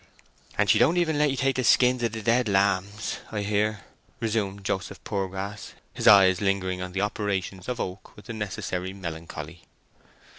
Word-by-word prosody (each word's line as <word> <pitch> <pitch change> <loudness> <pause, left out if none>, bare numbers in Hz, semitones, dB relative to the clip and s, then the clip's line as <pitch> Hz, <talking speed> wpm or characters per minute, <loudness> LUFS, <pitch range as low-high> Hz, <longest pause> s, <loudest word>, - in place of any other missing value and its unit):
"And - - +3
she - - +5
don't 170 - +4
even 160 -4 +1
let 150 0 +4
ye 135 - -1
have 135 0 +1
the 130 - -1
skins 125 +1 +4
of 115 -2 0
the 110 -1 -5
dead 115 +1 +2
lambs, 100 +1 0
I 105 -2 -2
hear?" 105 0 0 0.4
resumed 105 -3 -2
Joseph 95 -1 -3
Poorgrass, 100 +1 -4 0.2
his - - -2
eyes 95 -2 +7
lingering 95 -2 0
on 90 0 -5
the 95 - -1
operations 100 -1 -2
of 125 -1 -3
Oak 95 +1 -6
with 105 - -14
the 115 - -6
necessary 95 -3 -4
melancholy. 85 -2 -7
100 Hz, 175 wpm, -26 LUFS, 95-115 Hz, 0.4 s, eyes